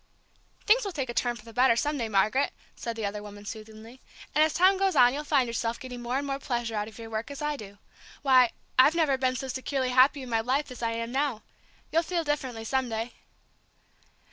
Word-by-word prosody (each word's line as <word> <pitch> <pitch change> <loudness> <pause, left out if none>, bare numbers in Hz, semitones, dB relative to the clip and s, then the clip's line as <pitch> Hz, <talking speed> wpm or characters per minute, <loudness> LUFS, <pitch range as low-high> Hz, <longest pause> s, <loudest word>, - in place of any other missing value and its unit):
"Things 470 +4 +5
will 400 - -3
take 270 -7 -3
a - - -8
turn 240 0 0
for 215 -1 -13
the 230 - -12
better 250 -1 +4
some 295 +5 0
day, 230 -2 -2
Margaret," 215 +7 +2 0.2
said 235 -1 -5
the 220 -2 -3
other 205 +1 -3
woman, 205 0 -11
soothingly; 220 +3 -10 0.3
"and 305 - +5
as 315 - +2
time 375 +4 +4
goes 390 -1 +2
on 245 0 +6
you'll 295 +2 -3
find 285 -4 +2
yourself 230 0 -2
getting 250 -2 -7
more 245 +2 -1
and 285 - -2
more 275 -1 -2
pleasure 240 -4 -2
out 210 -1 -2
of 220 - -12
your 225 -1 -9
work, 220 +3 -3
as 280 - -7
I 295 0 -1
do. 205 -5 -10 0.5
Why, 255 -3 +6 0.3
I've 290 +5 +7
never 310 -5 +3
been 260 -1 0
so 265 +2 -4
securely 260 0 -2
happy 260 +2 +4
in 255 - -8
my 225 -1 +1
life 260 +4 -1
as 250 - -9
I 230 -1 0
am 230 +1 -4
now. 270 -4 -1 0.5
You'll 330 - +3
feel 340 0 -2
differently 265 -6 -2
some 260 +1 0
day." 225 +2 -3
250 Hz, 230 wpm, -28 LUFS, 230-280 Hz, 0.5 s, I've